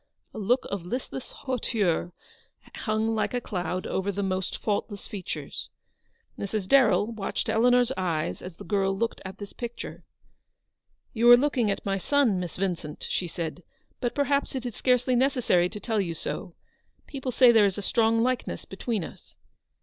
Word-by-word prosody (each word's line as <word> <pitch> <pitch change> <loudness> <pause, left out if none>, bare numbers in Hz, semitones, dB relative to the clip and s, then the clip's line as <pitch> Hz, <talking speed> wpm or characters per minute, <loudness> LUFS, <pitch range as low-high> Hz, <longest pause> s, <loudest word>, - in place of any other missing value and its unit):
A - - -6
look 245 +5 +2
of 200 -3 -3
listless 250 +6 -5
hauteur 215 - -1 0.6
hung 220 0 0
like 220 +3 0
a - - +2
cloud 185 -4 -3
over 190 +1 -1
the 200 +1 -2
almost 185 -1 -1
faultless 205 -1 -2
features. 195 -3 -5 0.7
Mrs. 200 -1 -2
Darrell 235 -4 +5
watched 215 -4 -3
Eleanor's 245 +2 +4
eyes 155 - -1
as 180 -2 -8
the - - -9
girl 195 -2 +1
looked 230 +2 -1
at 190 0 -7
this 205 0 -8
picture. 240 -1 -6 0.6
" - - -47
You 235 +1 +4
are 240 - +11
looking 255 -4 +1
at 200 - -2
my 195 -1 0
son, 250 -4 +2
Miss 175 -2 -5
Vincent," 175 -5 -3
she 180 - 0
said; 165 +1 -5 0.2
" - - -41
but 240 - -1
perhaps 285 0 +1
it 260 -1 -3
is 240 - -4
scarcely 250 0 +2
necessary 245 -9 +3
to 210 - -7
tell 220 -1 0
you 170 -3 -3
so. 170 +2 -5 0.5
People 265 -2 -4
say 250 0 +7
there 220 -3 +6
is 195 - -3
a 205 - -4
strong 225 +1 +3
likeness 255 0 -1
between 205 0 -3
us." - - -12
215 Hz, 175 wpm, -27 LUFS, 190-245 Hz, 0.7 s, are